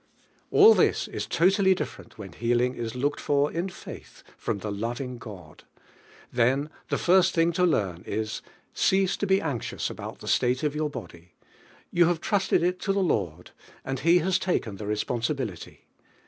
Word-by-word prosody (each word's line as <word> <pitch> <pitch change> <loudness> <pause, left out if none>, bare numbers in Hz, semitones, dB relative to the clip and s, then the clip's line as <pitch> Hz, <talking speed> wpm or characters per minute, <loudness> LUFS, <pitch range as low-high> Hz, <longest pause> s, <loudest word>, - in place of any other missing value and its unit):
All 430 +2 +8
this - - +2
is - - -5
totally 190 +2 +3
different - - -7
when 95 -4 -8
heal 120 +7 0
ing 125 +1 +1
is 115 -1 -5
looked 140 +3 -1
for 145 0 +1
in 175 +3 -2
faith 180 - -11
from - - -3
the 105 +1 -5
loving 120 +4 -4
God. 90 -9 -11 0.7
Then 130 +5 +2 0.2
[lie - - +1
first 185 0 +4
thing 165 0 +3
to 180 +2 0
loam 95 - 0
is: 110 +1 -3 0.3
Cease 190 0 +2
to 205 - -2
he 190 0 +4
anxious 140 -10 -3
about - - -7
the - - -11
slate 125 +2 +1
of 150 -2 0
your 150 0 -1
hody, 90 - -10 0.6
you 175 0 +4
have 175 -2 +1
t - - -6
reated 195 -4 +2
it 180 +1 0
t" 195 - 0
the 195 - +1
Lord 90 - -1 0.3
and 135 -1 -3
tic 170 +4 +4
has 190 0 +2
t 180 0 0
aken 100 -4 -9
the 105 - -5
responsibility. 115 - -3
135 Hz, 180 wpm, -26 LUFS, 110-175 Hz, 0.7 s, All